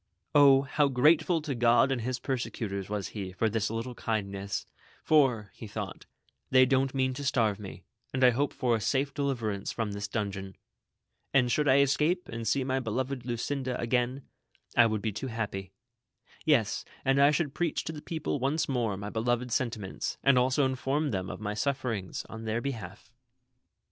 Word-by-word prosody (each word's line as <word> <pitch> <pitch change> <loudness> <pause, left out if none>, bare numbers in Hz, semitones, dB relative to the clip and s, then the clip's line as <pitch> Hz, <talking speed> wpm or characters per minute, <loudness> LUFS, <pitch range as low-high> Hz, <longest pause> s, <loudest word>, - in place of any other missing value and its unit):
O, 140 -2 +7
how 145 +2 +2
grateful 155 +5 +3
to 150 -3 -2
God 120 +2 +4
and 130 -3 0
his 125 +2 -2
persecutors 115 -7 -3
was 105 -2 -3
he 95 -3 -5
for 110 +3 0
this 110 -1 0
little 115 +3 -4
kindness, 100 -4 -3 0.4
for, 125 -9 +3 0.2
thought 100 - -6 0.4
he, 130 - +3
''They 130 0 +7
don't 135 0 +1
mean 130 -1 +1
to 145 - -6
starve 110 -7 +1
me, 100 -2 -9 0.3
and 130 0 0
I 125 - +8
hope 140 +4 0
for 120 -2 +1
a 110 - -2
safe 135 +4 0
deliverance 120 -9 -2
from 110 -3 -2
tliis 100 0 -4
dungeon; 100 -4 -4 0.8
and 125 -3 +4
should 150 +5 +2
I 135 +1 +6
escape 150 +6 +1
and 115 -1 -5
see 135 +5 +2
my 130 0 0
beloved 130 +1 -3
Lucinda 125 +2 -2
again, 125 +3 0 0.5
I 120 -1 +7
would 110 -2 -2
be 110 - 0
too 105 +6 -5
happy; 105 -5 -4 0.7
yes, 130 -10 +2 0.2
and 135 +1 +4
I 140 - +7
should 150 -2 0
preach 170 0 -1
to - - -4
the 150 - -8
people 160 -3 -3
once 140 +5 0
more 120 -7 0
my 100 +1 -6
beloved 120 +2 -1
sentiments, 110 -6 -2
and 135 0 +5
also 130 +3 +3
inform 135 +3 0
them 95 -2 -2
of - - -6
my 105 -1 -3
sufferings 115 -4 -2
on 110 0 -8
their 110 +1 0
behalf. 110 -5 -6
125 Hz, 180 wpm, -29 LUFS, 110-135 Hz, 0.8 s, I